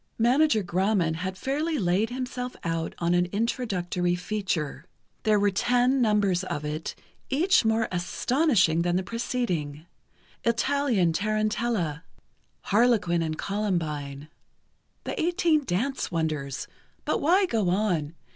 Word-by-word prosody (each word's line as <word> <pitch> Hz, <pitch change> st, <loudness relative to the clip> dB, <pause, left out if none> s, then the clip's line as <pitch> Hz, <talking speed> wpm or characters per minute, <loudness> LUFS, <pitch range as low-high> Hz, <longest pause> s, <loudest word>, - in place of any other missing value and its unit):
Manager 245 Hz, 0 st, +3 dB
Grauman 180 Hz, -2 st, +1 dB
had 190 Hz, +2 st, -4 dB
fairly 300 Hz, -, -1 dB
laid 190 Hz, +2 st, +1 dB
himself 250 Hz, 0 st, -4 dB
out 165 Hz, -1 st, -2 dB
on 170 Hz, 0 st, +1 dB
an 175 Hz, 0 st, +2 dB
introductory 185 Hz, -5 st, -1 dB
feature. 175 Hz, -5 st, -3 dB, 0.4 s
There 215 Hz, -2 st, +3 dB
were 205 Hz, 0 st, +3 dB
ten 245 Hz, +6 st, +2 dB
numbers 205 Hz, -5 st, +2 dB
of 150 Hz, -5 st, -4 dB
it, 155 Hz, +2 st, -4 dB, 0.3 s
each 340 Hz, +6 st, +3 dB
more 220 Hz, 0 st, +2 dB
astonishing 185 Hz, -, +2 dB
than 175 Hz, 0 st, +1 dB
the 185 Hz, -, +1 dB
preceding: 180 Hz, -, -3 dB, 0.6 s
"Italian 235 Hz, -, +2 dB
Tarantella," 215 Hz, -4 st, -1 dB, 0.6 s
"Harlequin 210 Hz, -6 st, +2 dB
and 155 Hz, -1 st, -2 dB
Columbine," 155 Hz, -9 st, -2 dB, 0.8 s
"The -, -, -3 dB
Eighteen 325 Hz, -3 st, +2 dB
Dance 245 Hz, +9 st, -1 dB
Wonders," 155 Hz, -5 st, -2 dB, 0.4 s
but -, -, 0 dB
why 365 Hz, +7 st, +4 dB
go 220 Hz, -, 0 dB
on? 175 Hz, -6 st, 0 dB
200 Hz, 120 wpm, -26 LUFS, 170-245 Hz, 0.8 s, why